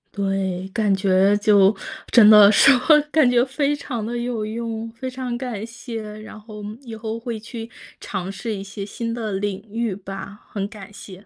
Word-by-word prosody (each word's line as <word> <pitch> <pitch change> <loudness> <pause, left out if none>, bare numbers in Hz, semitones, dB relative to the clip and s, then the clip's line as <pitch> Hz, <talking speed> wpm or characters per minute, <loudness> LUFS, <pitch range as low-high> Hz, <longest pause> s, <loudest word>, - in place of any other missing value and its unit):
对， 195 -2 -2
感 210 -2 +1
觉 190 +1 +3
就 205 -1 +4 0.4
真 220 -4 +8
的 210 -2 +9
说， 270 +7 +7 0.4
感 310 -6 +4
觉 245 -1 +4
非 280 +2 0
常 245 -6 -5
得 235 +2 -4
有 240 -2 -2
用。 225 0 -4
非 255 +3 -6
常 255 -1 -4
感 235 -5 -4
谢， 235 -1 -7 0.2
然 215 0 -11
后 210 -1 -10 0.2
以 230 -3 -8
后 220 +1 -5
会 230 -1 -5
去 225 +1 -8 0.3
尝 190 -1 -5
试 220 +3 -4
一 195 - -6
些 200 0 -7
新 230 +3 -5
的 230 -2 -3
领 200 +1 -3
域 230 -4 -1
吧， 195 +1 -8 0.2
很 200 -1 -2
感 205 -2 -12
谢， 195 0 -12
215 Hz, 190 characters per minute, -22 LUFS, 200-235 Hz, 0.4 s, 的